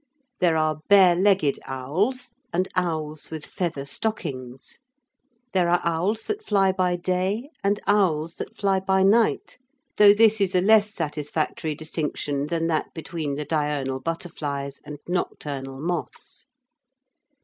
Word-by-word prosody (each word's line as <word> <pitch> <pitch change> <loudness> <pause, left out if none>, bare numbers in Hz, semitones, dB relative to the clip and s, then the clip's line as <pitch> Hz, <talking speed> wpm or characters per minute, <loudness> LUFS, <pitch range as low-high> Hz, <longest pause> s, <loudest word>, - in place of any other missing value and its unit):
There 170 -3 +3
are 155 -1 +1
bare 190 -3 +7
legged 185 -5 +2
owls 180 - -2 0.2
and 185 +2 0
owls 155 -4 -2
with 160 -1 -6
feather 165 -7 -3
stockings. 135 - -5 0.7
There 180 -2 +2
are 175 0 +4
owls 175 +7 0
that 425 0 -4
fly 195 - +3
by 185 -1 +1
day 185 - -1
and 200 +1 +1
owls 170 -6 +1
that - - -7
fly 195 -2 +1
by 190 0 +2
night, 220 +5 +2 0.4
though 205 -1 +8
this 220 -1 +4
is 190 -1 +1
a - - +5
less 210 +1 +5
satisfactory 155 -2 -3
distinction 150 -2 -3
than 165 0 -1
that 160 -2 -1
between 160 -3 -4
the 150 +1 -4
diurnal 145 -3 -1
butterflies 145 -3 -4
and 150 - -8
nocturnal 140 -6 -3
moths. 175 +4 -5
170 Hz, 135 wpm, -24 LUFS, 150-195 Hz, 0.7 s, though